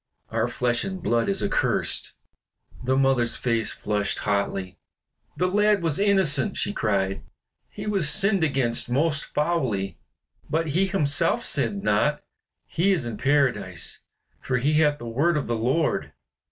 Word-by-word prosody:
Our 115 +1 0
flesh 120 0 -1
and 190 -1 -5
blood 120 -9 0
is 100 - -2
accursed." - - -1 0.7
The 130 +1 +1
mother's 130 -4 +2
face 115 -3 -1
flushed 105 -1 -2
hotly. 100 -2 -2 0.6
"The 180 - +1
lad 210 0 +2
was 160 -1 0
innocent!" 195 -3 +2
she 205 - -2
cried. 100 - -1 0.5
"He 205 - -8
was 195 -8 +3
sinned 195 +2 +4
against 130 -6 +1
most 145 +3 +1
foully, 130 - -2 0.5
but 160 0 -1
he 180 +7 +1
himself 145 -7 +2
sinned 110 -8 +1
not. 105 +9 +1 0.4
He 195 +4 +1
is 160 -10 -2
in 115 -3 -5
Paradise, 125 - 0 0.4
for 130 - -1
he 150 +5 +2
hath 150 -2 +3
the 120 - -9
word 145 +9 +1
of 145 - -2
the 120 - -2
Lord." 130 +8 0
140 Hz, 145 wpm, -24 LUFS, 115-170 Hz, 0.7 s, sinned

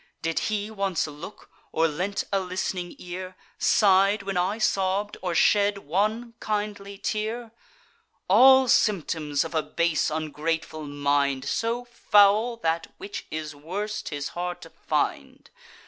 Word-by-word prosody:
Did 165 0 0
he 210 0 -2
once 195 -4 -1
look, 155 +6 -10 0.2
or 165 +1 +2
lent 180 +6 -2
a 195 - +3
list'ning 180 -1 -3
ear, 185 +1 -7 0.2
Sigh'd 200 0 +4
when 195 -1 -3
I 185 +4 0
sobb'd, 200 -1 0
or 180 -2 -2
shed 205 +3 +4
one 215 +7 -1
kindly 205 -2 -3
tear? 220 +3 -3 0.8
All 260 +6 +7
symptoms 160 -10 +1
of 165 - -7
a 160 - +2
base 170 0 0
ungrateful 155 0 -3
mind, 140 -1 0
So 230 +9 -1
foul, 220 0 +4
that, 165 0 0
which 380 +1 -7
is 155 -1 -5
worse, 200 +9 -4
'tis 145 -2 -4
hard 175 0 -4
to - - -12
find. - - -3
190 Hz, 130 wpm, -26 LUFS, 160-210 Hz, 0.8 s, All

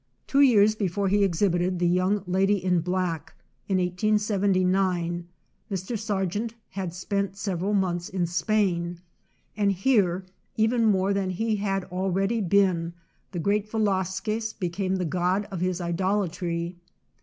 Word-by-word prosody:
Two 280 - +3
years 215 -6 +6
before 200 -2 -1
he 205 +1 +3
exhibited 180 -1 +1
the 175 0 +1
young 185 +3 +1
lady 190 +3 +2
in 180 -2 +1
black, 180 -1 -2 0.3
in 190 - +1
1879, 185 -2 +1 0.4
Mr. 190 +3 -3
Sargent 210 +1 -2 0.2
had 190 -2 -4
spent 195 +2 -2
several 195 0 -1
months 175 -3 0
in 185 -2 -1
Spain, 175 -1 0 0.6
and 200 -1 +2
here, 190 -3 +2 0.3
even 225 +1 +3
more 195 -1 +2
than 195 -1 -1
he 215 +4 -1
had 195 -1 -1
already 195 +4 0
been, 180 -3 +2 0.4
the 185 - -5
great 200 +4 0
Velasquez 215 +1 -1
became 185 0 -2
the 185 -1 -1
god 185 +4 0
of 190 - -4
his 185 0 0
idolatry. 175 -1 -1
190 Hz, 130 wpm, -26 LUFS, 180-205 Hz, 0.6 s, years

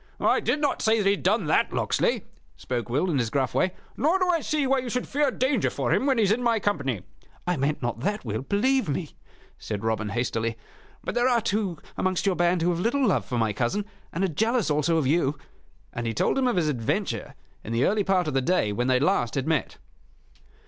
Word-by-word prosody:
"I - - +3
did 295 - 0
not 290 -2 0
say 220 +1 +3
that 210 - 0
he 195 - +5
had 200 - -1
done 200 0 +2
that, 150 - +2
Locksley," - - 0 0.3
spoke 120 -2 -4
Will, 150 +9 +1
in 140 - +1
his 120 -2 0
gruff 130 +1 0
way. 185 0 +1 0.2
"Nor 320 +6 +2
do 365 -1 +1
I 335 -3 +2
see 300 -2 0
why 270 0 +2
you 250 -1 -4
should 250 +2 -2
fear 290 0 +1
danger 260 +2 +1
for - - -1
him 270 - +1
when 270 -3 +3
he 225 - +4
is 200 - +3
in 230 +3 +1
my 235 -2 +2
company." 140 - -1 0.4
"I 180 0 +1
meant 140 -1 -1
not 120 -1 -2
that, 205 - -2
Will, 110 -1 -2
believe 245 - +1
me," 150 +2 -3 0.5
said 105 -1 -5
Robin, 110 -1 -1
hastily. 115 0 -1 0.5
"But - - -3
there 245 +1 +2
are 240 -2 +3
two 205 -5 -1 0.2
amongst 185 0 0
your 195 -2 +2
band 175 0 +2
who 175 - +3
have 170 - -2
little 250 +8 +1
love 200 - +1
for 125 - -3
my 110 -2 +1
cousin, 125 - -1 0.3
and 185 - -2
are - - +3
jealous 220 - 0
also 150 +3 +2
of 155 - +1
you 145 0 +1 0.3
" - - -34
And 120 0 -3
he 115 - -2
told - - +1
him 265 -1 +2
of 245 - +1
his 170 -4 +1
adventure 120 -7 -2 0.3
in 110 - -6
the 115 +2 +2
early 210 +1 +2
part 185 -3 +1
of 150 - -2
the 135 - +2
day 130 - +1
when 120 +4 -1
they 130 -1 +3
last 125 -4 +1
had 135 -1 -1
met. 160 -3 -1
175 Hz, 240 wpm, -26 LUFS, -, 0.5 s, he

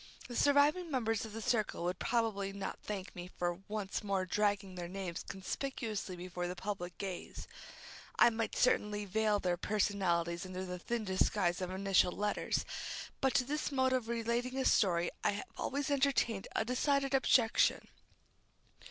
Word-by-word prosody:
The 240 - -7
surviving 290 +6 +4
members 225 -6 0
of 220 - -9
that 225 0 -5
circle 225 -8 0
would 180 +1 -1
probably 220 -5 0
not 195 0 -5
thank 200 -2 -6
me 175 0 -6
for 175 0 -1
once 210 -2 -3
more 195 -2 0
dragging 200 0 0
their 175 -1 -5
names 185 -2 -4
conspicuously 215 -1 -4
before 180 0 -4
the 180 - -4
public 185 -3 -4
gaze. 190 -3 -6 0.7
I 240 - +7
might 225 0 -2
certainly 210 -4 +2
veil 210 +2 +2
their 180 -2 0
personalities 175 -4 0
under 185 0 -5
the 180 -1 -5
thin 230 +4 -2
disguise 185 -1 +1
of 180 - -2
initial 190 -1 +3
letters, 210 0 -1 0.6
but 265 -1 +2
to 275 - +5
this 295 +3 -2
mode 260 -1 +2
of 250 -3 0
relating 235 +2 -1
a 265 - 0
story 175 -4 +3
I 205 - +3
have 205 - -4
always 285 +2 -2
entertained 265 -7 +2
a 220 - +1
decided 275 +3 +1
objection. 250 -3 +4
205 Hz, 160 wpm, -34 LUFS, 185-240 Hz, 0.7 s, I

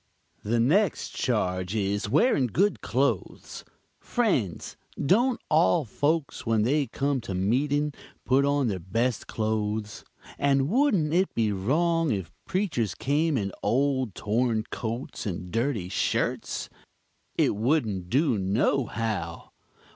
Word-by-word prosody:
"The 115 +3 0
next 165 - +2
charge 95 -5 -1
is, 100 0 -1
wearing 145 - +3
good 195 - +1
clothes. - - -2 0.4
Friends, 160 - -1 0.2
don't 235 - +2
all 160 0 +3
folks 145 +6 -1
when 110 -2 +2
they 140 +4 +1
come 140 +2 -1
to 100 -5 -5
meeting 140 +10 +1 0.3
put 130 +2 +3
on 140 -2 +2
their 100 -4 -2
best 115 +6 -1
clothes? 110 -1 -2 0.4
and 140 -1 +2
wouldn't 200 - +2
it 185 +2 +1
be 110 -2 +1
wrong 160 - +1
if 95 -6 -3 0.2
preachers 140 - -1
came 150 +2 +1
in 100 -3 -2
old 130 -4 +1
torn 110 +1 0
coats 115 0 -4
and 90 -1 -5
dirty 115 -5 -1
shirts? 95 - -1 0.7
It - - +2
wouldn't 110 - 0
do 130 - +2
no 115 +7 +1
how. 105 -7 -4
125 Hz, 125 wpm, -27 LUFS, 105-150 Hz, 0.7 s, wearing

